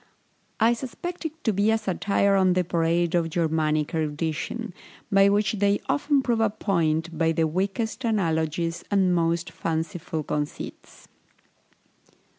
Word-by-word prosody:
I 230 +2 +5
suspect 330 +9 -6
it 320 +1 -15
to 220 - +1
be 200 +3 +2
a 220 - +4
satire 200 -1 +1
on 190 -2 +4
the 180 0 +2
parade 170 0 +1
of 170 -2 +1
Germanic 155 -2 0
erudition, 160 +7 -2 0.4
by 195 0 +6
which 205 0 +2
they 200 0 +3
often 285 -1 +2
prove 235 -3 +1
a 220 - +3
point 170 -5 0
by 165 0 +2
the 160 0 +2
weakest 195 +9 -2
analogies 165 -6 0
and 190 -3 +3
most 170 0 0
fanciful 165 0 -3
conceits. 150 0 -5
180 Hz, 135 wpm, -25 LUFS, 165-210 Hz, 0.4 s, by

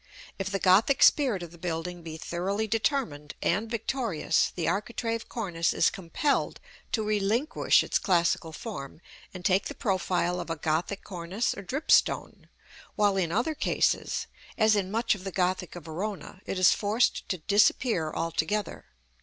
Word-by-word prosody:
If 195 0 -2
the 195 - -1
Gothic 200 +9 +4
spirit 245 -11 +4
of 170 - -9
the 170 - -15
building 175 +1 -4
be 160 -1 -7
thoroughly 190 +6 -2
determined, 220 - -1
and 210 +6 0
victorious, 230 - 0
the 175 - -2
architrave 230 +4 -2
cornice 175 -8 -1
is - - +3
compelled 195 - -1 0.3
to 220 - +1
relinquish 215 +7 +2
its - - 0
classical 170 -3 +1
form, 160 - -7 0.3
and 180 -1 -10
take 190 0 +3
the - - -7
profile 180 -3 0
of 175 - -6
a 165 - -1
Gothic 160 +6 -2
cornice 185 +4 -2
or - - -7
dripstone; 275 - +1 0.5
while, 205 -2 +3
in 180 -4 0
other 240 - 0
cases, - - 0 0.3
as 220 -1 +4
in 195 -2 0
much 230 +3 +1
of 195 -3 -8
the 195 - -4
Gothic 180 -1 -1
of 175 -4 -9
Verona, 185 +3 -5
it - - -2
is 185 +1 +6
forced 215 +3 0
to 185 - -1
disappear 200 -1 +2
altogether. 165 +6 -2
195 Hz, 155 wpm, -28 LUFS, 170-220 Hz, 0.5 s, is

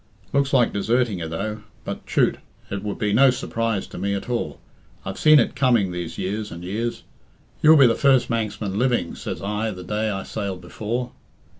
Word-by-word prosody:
Looks 140 0 +2
like 125 -4 +3
deserting 110 0 +1
you, 80 - -4
though. 105 +6 -4 0.2
But, - - -6
chut! - - +2 0.3
it 100 -1 -3
would 105 0 -4
be 105 -2 0
no 135 +5 +6
surprise 115 -4 -1
to - - -8
me 100 +2 0
at 100 - -5
all. 120 - -2 0.5
I've - - -5
seen 155 0 +7
it 145 - +2
coming 120 -8 +3
these 90 -2 -5
years 105 +3 -3
and 85 +1 -8
years. 110 +6 -3 0.6
'You'll 155 +1 +8
be 140 - +8
the 115 - +5
first 130 0 +3
Manxman 105 -3 -2
living,' 120 -9 +1
says - - -6
I 105 +2 -1
the 90 -3 -7
day 105 +4 -1
I 95 -2 -3
sailed 100 -4 -4
before. 115 +7 -4
110 Hz, 190 wpm, -23 LUFS, 100-120 Hz, 0.6 s, You'll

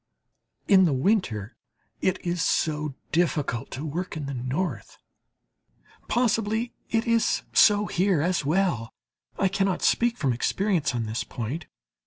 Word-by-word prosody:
In 190 -3 +6
the 155 - +2
winter 130 - 0 0.5
it 185 0 +1
is 175 -1 -1
so 150 -4 0 0.2
difficult 150 -7 0
to 140 +4 -6
work 165 +3 -4
in 150 - -4
the 140 - -4
North. 130 - -3 1.1
Possibly 225 -1 0 0.2
it 225 0 +1
is 230 -1 +2
so 205 -1 +5
here, 185 -3 +1
as 175 +2 +1
well; 150 - 0 0.4
I 195 - +2
cannot 195 -1 0
speak 240 0 +2
from 135 -7 +1
experience 165 - 0
on 120 - -1
this 110 +1 -3
point. 135 +7 -5
175 Hz, 135 wpm, -26 LUFS, 135-195 Hz, 1.1 s, In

